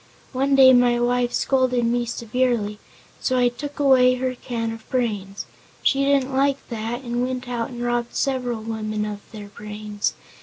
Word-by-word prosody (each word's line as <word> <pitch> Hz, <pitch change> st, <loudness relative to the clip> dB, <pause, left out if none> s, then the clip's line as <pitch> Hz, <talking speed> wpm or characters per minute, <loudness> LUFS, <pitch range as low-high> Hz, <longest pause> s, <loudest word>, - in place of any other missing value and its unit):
One 275 Hz, +2 st, +2 dB
day 260 Hz, -1 st, +8 dB
my 245 Hz, -1 st, +4 dB
wife 245 Hz, 0 st, +1 dB
scolded 255 Hz, -3 st, +1 dB
me 240 Hz, +1 st, 0 dB
severely, 235 Hz, -3 st, -1 dB, 0.4 s
so 255 Hz, -, 0 dB
I 245 Hz, -1 st, +4 dB
took 285 Hz, +4 st, -8 dB
away 255 Hz, -3 st, +5 dB
her 255 Hz, 0 st, -2 dB
can 235 Hz, -2 st, -4 dB
of 225 Hz, 0 st, -10 dB
brains. 205 Hz, -6 st, -2 dB, 0.4 s
She 275 Hz, 0 st, +3 dB
didn't 275 Hz, -1 st, +2 dB
like 275 Hz, +1 st, +1 dB
that 230 Hz, +2 st, -4 dB
and 240 Hz, -1 st, -2 dB
went 255 Hz, 0 st, -3 dB
out 235 Hz, -2 st, -2 dB
and 240 Hz, -2 st, -6 dB
robbed 240 Hz, 0 st, -1 dB
several 250 Hz, -4 st, -1 dB
women 215 Hz, -1 st, -3 dB
of 210 Hz, -1 st, -5 dB
their 210 Hz, -2 st, -9 dB
brains. 210 Hz, 0 st, -4 dB
245 Hz, 165 wpm, -23 LUFS, 225-255 Hz, 0.4 s, day